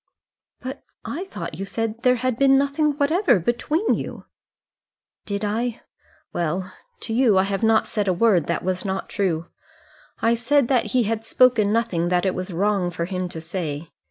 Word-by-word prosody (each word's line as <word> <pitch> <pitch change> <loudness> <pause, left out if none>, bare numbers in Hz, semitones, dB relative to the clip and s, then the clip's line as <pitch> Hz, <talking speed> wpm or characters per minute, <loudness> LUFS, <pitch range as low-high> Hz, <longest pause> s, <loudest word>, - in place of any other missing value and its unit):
"But 260 +1 -7 0.2
I 350 +6 -4
thought 385 - -7
you - - -2
said 225 +3 -3
there 250 0 +4
had 250 -1 -2
been 270 -1 +5
nothing 285 +2 +1
whatever 315 - +3
between 295 - 0
you." - - -5 1.0
"Did 200 0 -2
I? 230 +3 -2 0.5
Well, 175 +3 -2 0.3
to 225 - -4
you 230 -4 +4
I 190 - +5
have 195 +1 -2
not 220 -1 +3
said 210 -3 -2
a - - +4
word 200 -9 +4
that 170 - -1
was 185 0 -1
not 190 -1 -3
true. 170 -4 -1 0.7
I 230 +1 +3
said 240 +3 +2
that 255 -2 +1
he 245 - +4
had 225 +1 -2
spoken 230 -3 +3
nothing 210 -7 0
that 180 +1 +1
it 190 - +1
was 185 +1 -5
wrong 195 +1 +1
for 170 -1 -3
him 185 0 -3
to 165 - -6
say. 160 -2 -5
215 Hz, 180 wpm, -23 LUFS, 185-245 Hz, 1.0 s, been